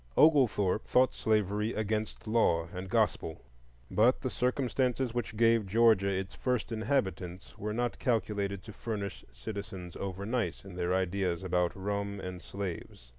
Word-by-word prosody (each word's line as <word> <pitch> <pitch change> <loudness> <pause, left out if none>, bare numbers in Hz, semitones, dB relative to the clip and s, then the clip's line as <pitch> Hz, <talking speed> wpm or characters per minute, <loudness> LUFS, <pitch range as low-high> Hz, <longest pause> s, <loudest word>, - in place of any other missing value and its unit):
Oglethorpe 120 - +4
thought 130 0 +4
slavery 105 0 +1
against 110 0 -2
law 110 -7 +2
and 95 +1 -5
gospel; 105 -7 0 0.5
but 120 +4 +4
the 130 - -2
circumstances 125 -1 0
which 120 -3 -3
gave 115 -2 +4
Georgia 110 -1 +4
its 95 -1 -2
first 125 -3 -1
inhabitants 100 -6 -2
were 105 +1 -4
not 120 +2 -1
calculated 100 -4 0
to 110 - -10
furnish 100 -4 -4
citizens 95 - -7
over 95 0 -4
nice 115 -2 -2
in 95 - -9
their 90 0 -1
ideas 95 -1 0
about 90 -1 +1
rum 100 +1 -2
and 90 -1 -6
slaves. 90 -12 -6
105 Hz, 140 wpm, -31 LUFS, 95-115 Hz, 0.5 s, Oglethorpe